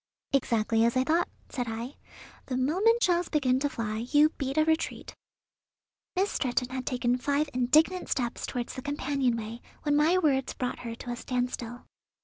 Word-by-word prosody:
"Exactly 225 -4 +2
as 235 +2 +2
I 255 - +4
thought," 330 +5 +1 0.2
said 245 -2 -3
I; 230 +4 -5 0.5
"the 255 - -2
moment 390 - +3
shells 350 -1 +2
begin 260 -4 +2
to 285 +1 0
fly, 215 -4 -3
you 300 0 +6
beat 275 -2 -4
a 310 - +5
retreat." 320 0 -1 1.0
Miss 385 +3 +1
Stretton 250 0 0
had 260 0 -5
taken 245 -1 +1
five 285 +2 0
indignant 305 +9 +3
steps 240 -2 -1
toward 245 -1 -3
the 260 - -6
companion 275 -3 0
way 225 +2 -6 0.2
when 290 -1 +2
my 310 +5 +4
words 275 -7 +1
brought 250 -1 -3
her 230 -1 -5
to 245 +1 -7
a - - -2
standstill. 245 -1 -3
260 Hz, 170 wpm, -28 LUFS, 245-300 Hz, 1.0 s, you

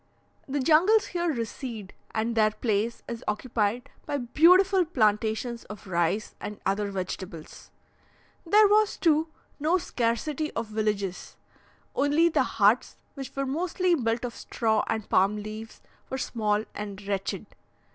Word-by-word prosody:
The 285 +1 -1
jungles 345 +10 +4
here 345 -1 0
recede, 230 -4 -5 0.2
and 225 +2 -1
their 215 -2 +4
place 215 +1 -1
is 235 -1 -6
occupied 220 +1 -1 0.2
by 285 - -1
beautiful 360 +9 +5
plantations 225 -4 0
of 210 -1 -10
rice, 185 +3 0
and 210 - -6
other 200 +1 0
vegetables. 185 -4 -6 0.7
There 415 +5 +6
was, 425 +1 +3
too, 320 -1 +3 0.3
no 315 +5 +2
scarcity 285 +1 -1
of 230 - -2
villages, 210 -3 -3 0.6
only 295 +4 +3
the - - +2
huts, - - +2 0.2
which 275 -2 -8
were 275 0 -1
mostly 350 +5 0
built 235 -5 0
of 240 - -5
straw 220 -2 0
and 220 -2 -2
palm 195 +3 +3
leaves, 215 +1 -8 0.3
were 265 - -3
small 215 -4 -1
and 205 -2 -6
wretched. 195 -1 -2
230 Hz, 135 wpm, -27 LUFS, 210-305 Hz, 0.7 s, There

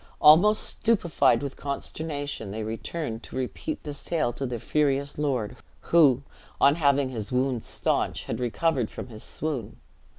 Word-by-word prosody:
Almost 180 +8 +6
stupefied 190 -10 +2
with 140 -1 -4
consternation, 145 -4 -4
they 110 +2 -4
returned 115 +2 -4
to - - -11
repeat 130 - -4
this 145 -2 -4
tale 155 -8 0
to 135 +2 -3
their 120 -1 -3
furious 140 +2 0
lord; 130 -8 -1 0.4
who, 140 -6 +6 0.4
on 140 - +6
having 140 -4 +2
his 110 -3 -5
wounds 125 -2 0
staunched, - - -1
had - - -4
recovered 125 +1 0
from - - -8
his 110 -2 -9
swoon. 145 -9 -3
140 Hz, 145 wpm, -26 LUFS, 120-155 Hz, 0.4 s, Almost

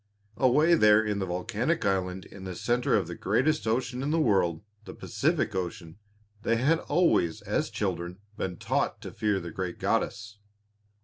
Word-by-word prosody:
Away 150 +6 +4
there 105 -8 +6
in 105 -1 -1
the 95 - -2
volcanic 115 - -1
island 95 -1 -1
in 95 - -12
the 95 -1 -6
centre 120 +6 +1
of - - +1
the - - -6
greatest 155 -2 0
ocean 125 +2 -1
in 140 - -2
the 165 +2 +2
world 95 - +2 0.2
the - - -9
Pacific - - 0
Ocean 90 -1 -5 0.4
they 115 - +1
had 145 +8 +2
always 165 - +1
as - - -1
children 85 +1 -3 0.2
been 95 -3 -4
taught - - -1
to - - -7
fear 105 -2 0
the 85 -2 -7
great 90 0 -4
goddess. 105 0 -2
105 Hz, 170 wpm, -28 LUFS, 90-125 Hz, 0.4 s, there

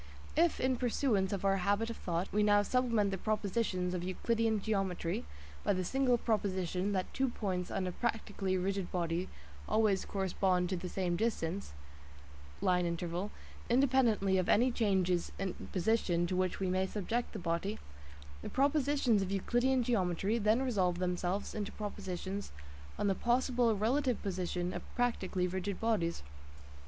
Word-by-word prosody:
If, 335 +2 +3
in 260 0 +1
pursuance 235 -5 +1
of 200 -1 -2
our 195 0 +3
habit 205 +5 +1
of 230 - -7
thought, 175 +1 -2
we 210 - +3
now 205 0 +5
supplement 230 -4 +1
the 190 - -3
propositions 200 -3 -1
of 180 -1 -2
Euclidean 220 +4 0
geometry 195 - -1 0.4
by - - +2
the 185 -1 -1
single 260 +2 +2
proposition 195 -4 0
that 185 -1 -2
two 265 -1 +1
points 185 -6 -2
on 190 - -2
a 180 - -1
practically 205 -3 -1
rigid 190 0 -2
body 170 0 -1 0.4
always 215 -3 +3
correspond 185 -2 0
to 185 - 0
the 180 +1 -5
same 180 -2 -1
distance 200 - -2 0.9
(line 180 -2 +2
interval), 170 +3 -2 0.4
independently 240 -7 +3
of 185 - -1
any 250 +4 +4
changes 190 -6 +1
in 195 -2 -2 0.2
position 180 -3 +1
to 180 +1 -2
which 185 0 0
we 190 - 0
may 185 +1 +1
subject 220 +5 -2
the - - -6
body, 180 +3 -2 0.6
the - - -5
propositions 275 -5 +2
of 190 - -2
Euclidean 245 +6 +2
geometry 200 -1 +1
then 220 +4 +3
resolve 190 -9 +1
themselves 180 +2 -1
into 210 -2 -3
propositions 200 -1 -5 0.5
on - - -1
the 195 - +3
possible 240 0 +2
relative 250 +4 +1
position 180 -2 -2
of - - -4
practically 195 -7 0
rigid 190 +2 -3
bodies. 190 - 0
195 Hz, 150 wpm, -33 LUFS, 180-230 Hz, 0.9 s, now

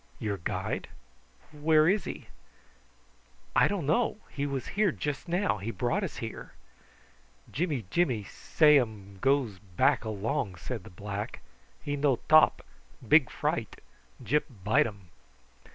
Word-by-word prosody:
"Your 105 -2 -2
guide? 85 - -3 0.7
Where 155 +1 +4
is 200 +3 +2
he?" - - -6 1.3
"I - - +6
don't 200 -7 -2
know. 195 - +1
He 145 0 -2
was 135 -2 -4
here 205 -1 +2
just 145 +1 -4
now. 175 - 0
He 100 +4 -4
brought 130 - -1
us 185 - -4
here." 115 -1 -7 1.0
"Jimmy 150 - -1
Jimmy 130 -12 +1
say 150 +8 +4
um 100 -5 -5
goes 135 -8 +1
back 90 +3 +1
along," 110 -1 -2
said 85 - -6
the - - -10
black. 100 +5 -6 0.4
"He 145 - -2
no 140 -2 +2
top, 155 0 +5 0.4
big - - +6
fright. - - -2 0.4
Gyp 150 0 +1 0.2
bite 105 +3 +3
um." 100 -5 -11
135 Hz, 135 wpm, -29 LUFS, 105-155 Hz, 1.3 s, I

